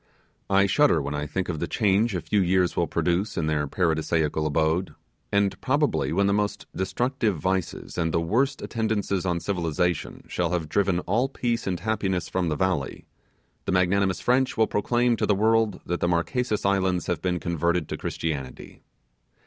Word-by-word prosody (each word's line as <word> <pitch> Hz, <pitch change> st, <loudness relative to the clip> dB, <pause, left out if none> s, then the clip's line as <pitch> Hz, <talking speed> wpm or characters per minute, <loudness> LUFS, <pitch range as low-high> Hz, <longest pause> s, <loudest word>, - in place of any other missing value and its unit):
I 100 Hz, 0 st, +4 dB
shudder 145 Hz, -, +4 dB
when 70 Hz, 0 st, -3 dB
I 75 Hz, 0 st, -3 dB
think 95 Hz, +4 st, -2 dB
of 80 Hz, -4 st, -3 dB
the 85 Hz, -, -2 dB
change 105 Hz, 0 st, +2 dB
a 90 Hz, -, -1 dB
few 105 Hz, -, +1 dB
years 90 Hz, -1 st, +2 dB
will 85 Hz, -, +1 dB
produce 85 Hz, +7 st, 0 dB
in 80 Hz, -, 0 dB
their 75 Hz, -1 st, 0 dB
paradisaical 80 Hz, -1 st, 0 dB
abode; 80 Hz, +4 st, 0 dB, 0.4 s
and 100 Hz, -1 st, +1 dB
probably 145 Hz, +2 st, +1 dB
when 100 Hz, +4 st, +2 dB
the 100 Hz, -, +2 dB
most 105 Hz, 0 st, -1 dB
destructive 110 Hz, +2 st, -1 dB
vices, 95 Hz, +1 st, -2 dB
and 80 Hz, -1 st, +1 dB
the 85 Hz, -, +1 dB
worst 125 Hz, +12 st, 0 dB
attendances 105 Hz, -4 st, -1 dB
on 85 Hz, -1 st, 0 dB
civilization, 90 Hz, -2 st, -2 dB
shall 90 Hz, 0 st, -1 dB
have 85 Hz, -3 st, -1 dB
driven 95 Hz, -1 st, +1 dB
all 115 Hz, +10 st, 0 dB
peace 120 Hz, -5 st, -2 dB
and 90 Hz, -2 st, -2 dB
happiness 100 Hz, -4 st, -1 dB
from 90 Hz, -2 st, 0 dB
the 75 Hz, -, 0 dB
valley, 90 Hz, -6 st, -1 dB, 0.6 s
the -, -, -1 dB
magnanimous 95 Hz, +1 st, +2 dB
French 130 Hz, +1 st, +1 dB
will 110 Hz, -, +5 dB
proclaim 120 Hz, +3 st, +1 dB
to -, -, 0 dB
the 105 Hz, -, +3 dB
world 110 Hz, -1 st, +2 dB
that 90 Hz, -, -2 dB
the -, -, +1 dB
Marquesas 100 Hz, +7 st, 0 dB
Islands 95 Hz, -2 st, +1 dB
have 85 Hz, -3 st, -2 dB
been 90 Hz, -1 st, 0 dB
converted 85 Hz, 0 st, 0 dB
to -, -, -2 dB
Christianity! 70 Hz, -6 st, -5 dB
95 Hz, 175 wpm, -25 LUFS, 85-105 Hz, 0.6 s, will